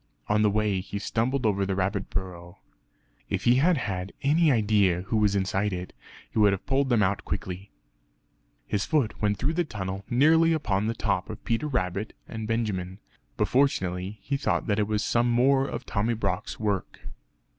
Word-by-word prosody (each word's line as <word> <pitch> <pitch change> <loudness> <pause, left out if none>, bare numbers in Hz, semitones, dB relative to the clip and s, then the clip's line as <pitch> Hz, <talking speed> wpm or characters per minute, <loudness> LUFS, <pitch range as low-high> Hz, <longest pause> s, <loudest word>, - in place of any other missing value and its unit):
On 105 0 +2
the 105 - +4
way, 105 -2 +1
he 100 +2 -5
stumbled 120 +5 -1
over 100 -2 +2
the 95 0 -1
rabbit 95 +1 -1
burrow. 90 -1 -5 0.7
If 100 0 -2
he 120 +2 +5
had 165 +5 +4
had 95 -5 -3
any 155 +3 +4
idea 105 -6 +3
who 110 +3 -1
was 105 -2 +2
inside 95 +1 0
it, 90 0 -5 0.4
he - - -1
would 105 -2 +5
have 95 - -5
pulled 135 0 +1
them 115 -4 +3
out 100 +1 0
quickly. 95 +2 -5 1.0
His 100 -1 -1
foot 145 -11 0
went 105 -1 +1
through 135 - 0
the 175 +1 +1
tunnel 95 - -5
nearly 160 +6 +4
upon 110 -10 0
the 115 - -1
top - - -1
of 110 0 -8
Peter 120 +6 0
Rabbit 105 -6 -2
and 110 -1 -5
Benjamin, 100 -5 -2 0.4
but - - +1
fortunately 95 -7 0
he 140 +4 -1
thought - - 0
that 105 -1 0
it 105 - +1
was 105 +1 0
some 120 +1 +2
more 135 +3 +3
of - - -5
Tommy 110 +3 0
Brock's 110 - -3
work. 105 -4 -2
105 Hz, 185 wpm, -27 LUFS, 95-120 Hz, 1.0 s, he